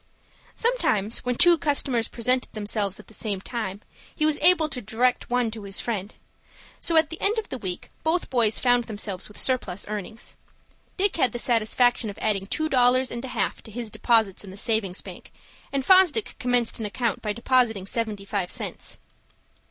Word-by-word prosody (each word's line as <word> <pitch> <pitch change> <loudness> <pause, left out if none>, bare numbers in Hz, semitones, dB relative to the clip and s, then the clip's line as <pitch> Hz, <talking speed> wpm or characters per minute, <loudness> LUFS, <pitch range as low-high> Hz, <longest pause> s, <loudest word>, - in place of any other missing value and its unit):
Sometimes, 230 - +1
when 250 0 -2
two 345 +4 +5
customers 270 -6 +1
presented 250 +2 +1
themselves 205 -2 -1
at 210 - -13
the - - -15
same 205 -3 -3
time, 205 -2 -5 0.3
he 305 - +1
was 310 -1 +2
able 350 -3 +6
to 275 -4 -5
direct 245 +4 0
one 245 -2 +1
to 220 0 -8
his 200 -1 -4
friend. 210 -3 -3 0.6
So 330 - +2
at 315 0 +4
the 325 - -6
end 425 +3 +2
of 445 - -3
the 260 - -5
week 185 -4 -5
both 330 +2 0
boys 230 -4 +3
found 245 -1 +3
themselves 205 -4 -4
with 210 - -13
surplus 250 -8 -1
earnings. 210 +2 -5 0.6
Dick 395 -1 +1
had 260 - +2
the - - -2
satisfaction 240 0 +2
of 200 - -8
adding 200 -3 -1
two 315 +8 -1
dollars 255 -2 +3
and 235 +1 -5
a - - -5
half 225 -6 -2
to - - -13
his 225 0 -5
deposits 220 -5 +2
in 195 - -10
the 190 - -10
Savings 205 -4 0
Bank, - - -11 0.4
and 275 -1 -2
Fosdick 375 +3 +4
commenced 245 -3 +1
an 220 - -2
account 230 0 -2
by 210 - -2
depositing 235 -3 +1
seventy 210 -2 -2
five 195 -3 -2
cents. - - -4
235 Hz, 185 wpm, -25 LUFS, 210-260 Hz, 0.6 s, able